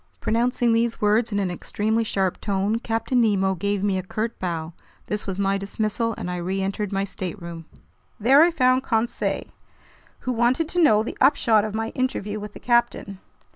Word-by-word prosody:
Pronouncing 235 +1 +1
these 230 0 +1
words 215 +2 +2
in 205 - -1
an 195 -3 0
extremely 220 +5 -1
sharp 190 -4 -1
tone, 200 +2 0
Captain 230 +2 0
Nemo 195 -4 +2
gave 200 +2 -2
me 195 -2 +1
a - - -2
curt 215 +5 -4
bow. 165 -2 -3 0.3
This 210 0 -4
was 190 -1 -3
my 195 0 +1
dismissal, 215 +3 -2
and 180 - -4
I 180 - -3
reentered 195 +3 -2
my 195 0 0
stateroom. 170 -4 -6 0.5
There 265 +7 +6
I 335 - +6
found 255 -5 +3
Conseil, 235 -2 -1 0.8
who 255 - -2
wanted 245 +6 +1
to 355 - +1
know 215 -9 +5
the 230 - -7
upshot 235 -6 +4
of 215 0 -4
my 225 0 -2
interview 215 -5 -2
with 210 0 -8
the - - -10
captain. 235 -5 0
215 Hz, 175 wpm, -24 LUFS, 195-235 Hz, 0.8 s, There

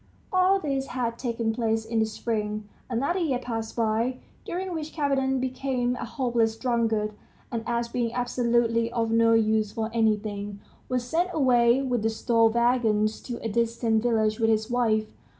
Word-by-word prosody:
All 370 +1 +4
this 275 -5 -2
had 235 -2 -3
taken 230 -3 -1
place 225 -1 0
in 225 0 -1
the 220 - +2
spring. 215 -1 -3 0.2
Another 275 +10 0
year 300 -8 +1
passed 225 -3 -5
by, 230 +2 0 0.3
during 370 +1 -3
which 315 -2 -5
Kapiton 270 -3 +1
became 255 -1 -1
a 245 - -5
hopeless 235 -3 0
drunkard, 225 -4 0 0.4
and 230 -1 -3
as 235 0 0
being 235 -1 -1
absolutely 235 -1 +1
of 230 -2 -1
no 230 0 +4
use 215 -1 +2
for 220 0 -3
anything, 210 -2 0 0.3
was 250 -1 0
sent 330 +9 0
away 250 -2 +4
with 250 -4 0
the 220 - +1
store 225 0 +3
wagons 225 -2 +2
to 240 -2 -5
a - - -1
distant 230 0 +1
village 220 -2 +1
with 225 -1 +3
his 220 +1 +1
wife. 220 -3 +2
235 Hz, 165 wpm, -26 LUFS, 220-250 Hz, 0.4 s, All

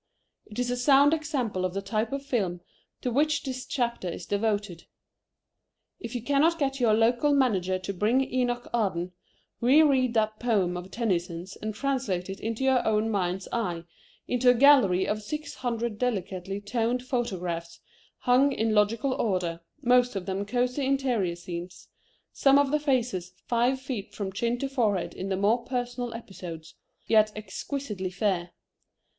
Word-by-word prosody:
It 210 - -11
is 245 0 0
a 245 - -1
sound 280 +3 +5
example 275 - -1
of 185 0 -2
the 195 - -1
type 215 +2 -1
of 275 0 -4
film 190 -10 -1 0.4
to 250 - -1
which 290 +3 +2
this 255 -1 -5
chapter 235 -8 -1
is - - -6
devoted. 205 -4 -1 1.1
If 230 +1 -7
you 240 - -3
cannot 290 +5 +3
get 275 -3 -1
your 225 -3 +4
local 240 +6 +3
manager 190 -9 +2
to 185 +2 -5
bring 215 +8 +2
Enoch 245 -1 0
Arden, 185 -6 0 0.5
reread 260 -1 +4
that 215 -1 +1
poem 200 -7 +1
of 180 +1 -6
Tennyson's 185 -4 -2
and 215 -1 -5
translate 215 -9 -1
it 195 - -7
in 225 +1 -3
your 265 +1 +2
own 220 +1 +1
mind's 185 -2 -1
eye 180 -8 -2 0.4
into 250 0 +3
a 245 - +6
gallery 235 -9 +5
of 215 0 -1
six 300 +8 -5
hundred 235 -3 -3
delicately 195 -5 -2
toned 230 +4 -1
photographs 180 -10 -3 0.4
hung 255 +3 +4
in 220 -3 0
logical 220 +5 +2
order, 180 -8 -1 0.2
most 245 -1 +4
of 190 -2 -3
them 195 +1 -3
cosy 250 +4 0
interior 255 -10 +1
scenes, 175 +1 -8 0.4
some 275 0 +5
of 285 -1 +3
the 300 - +2
faces 240 - -1
five 245 +2 +1
feet 255 -6 -6
from 195 -2 -4
chin 235 +4 0
to 275 - -2
forehead 220 -9 0
in 190 - -5
the 190 - 0
more 215 +5 +2
personal 245 -1 -3
episodes, 170 -7 -9 0.3
yet 215 -1 +4
exquisitely 210 0 -4
fair. 185 -2 -1
225 Hz, 160 wpm, -27 LUFS, 190-255 Hz, 1.1 s, a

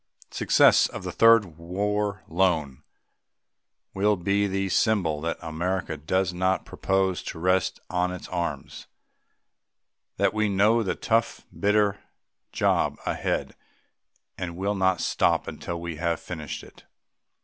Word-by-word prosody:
Success - - +4
of - - -8
the - - -4
Third 110 -8 +4
War 100 +3 -2
Loan 80 -6 0 1.1
will 105 +2 +2
be 100 +3 +1
the 95 0 -1
symbol 90 -8 +1
that 85 +1 -2
America 85 +2 -2
does 90 +5 -1
not 95 +1 0
propose 95 -1 0
to - - -7
rest 90 +2 +1
on 90 0 0
its 90 - -7
arms 85 -6 -4 1.3
that - - +2
we 110 -1 +1
know 105 +4 +3
the 95 - -1
tough, 115 +1 0
bitter 105 -1 +2 0.5
job - - +1
ahead - - -2 0.8
and 85 -1 -5
will 100 +2 -1
not 95 -3 +1
stop - - +1
until 85 -1 -5
we 85 -2 -6
have 85 -1 -1
finished 80 -5 -6
it. - - -16
95 Hz, 125 wpm, -26 LUFS, 85-100 Hz, 1.3 s, Success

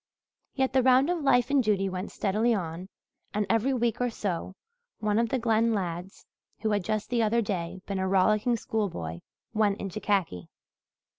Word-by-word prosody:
Yet 265 -1 +1
the 265 - +4
round 260 +5 +4
of 350 -2 -1
life 245 -3 +3
and 280 -2 +4
duty 200 -3 +1
went 185 +1 -4
steadily 220 +4 +1
on 175 0 -5 0.5
and 210 0 +1
every 230 +4 +2
week 240 -2 0
or 245 - +2
so 190 -4 -4 0.4
one 210 0 +1
of 230 -1 +1
the 265 - +1
Glen 230 -1 +2
lads 180 -1 -5 0.4
who 220 0 0
had 205 -2 +1
just 215 +3 -2
the 240 -1 +2
other 225 +2 +2
day 185 -2 -3
been 195 -1 -3
a 190 - 0
rollicking 215 +5 +3
schoolboy 175 - -3 0.3
went 210 -2 +2
into 195 +1 -5
khaki. 190 - -1
215 Hz, 175 wpm, -28 LUFS, 190-235 Hz, 0.5 s, the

